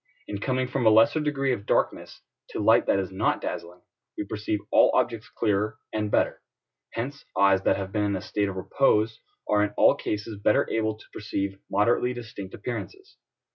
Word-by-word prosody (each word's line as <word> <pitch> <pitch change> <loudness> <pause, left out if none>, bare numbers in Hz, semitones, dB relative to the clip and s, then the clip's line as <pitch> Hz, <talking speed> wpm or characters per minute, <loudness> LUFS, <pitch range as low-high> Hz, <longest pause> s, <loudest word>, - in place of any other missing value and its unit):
In 100 - -4
coming 130 +3 0
from 125 0 -2
a 110 - +6
lesser 115 +8 +5
degree 140 -3 0
of 105 -3 -6
darkness - - -1 0.3
to - - -5
light - - +4
that - - +3
is 95 -1 -2
not 95 - 0
dazzling, 85 +1 -6 0.4
we - - -2
perceive 105 +1 -2
all - - +6
objects 115 -2 0
clearer 105 0 0 0.2
and 105 -1 -1
better: - - +1 0.5
hence 135 +5 -4
eyes 100 -1 +5
that - - +3
have 95 -1 -5
been 105 0 0
in 100 -1 0
a 95 - -3
state 100 -1 -1
of 95 - -6
repose 110 +2 +1 0.3
are 105 0 +3
in 105 0 -2
all - - +6
cases 105 0 -4
better 105 - +3
able 110 -1 0
to - - -16
perceive 100 -2 -3
moderately 120 +4 +2
distinct 110 -5 -8
appearances. 385 - -7
105 Hz, 185 wpm, -26 LUFS, 100-120 Hz, 0.5 s, a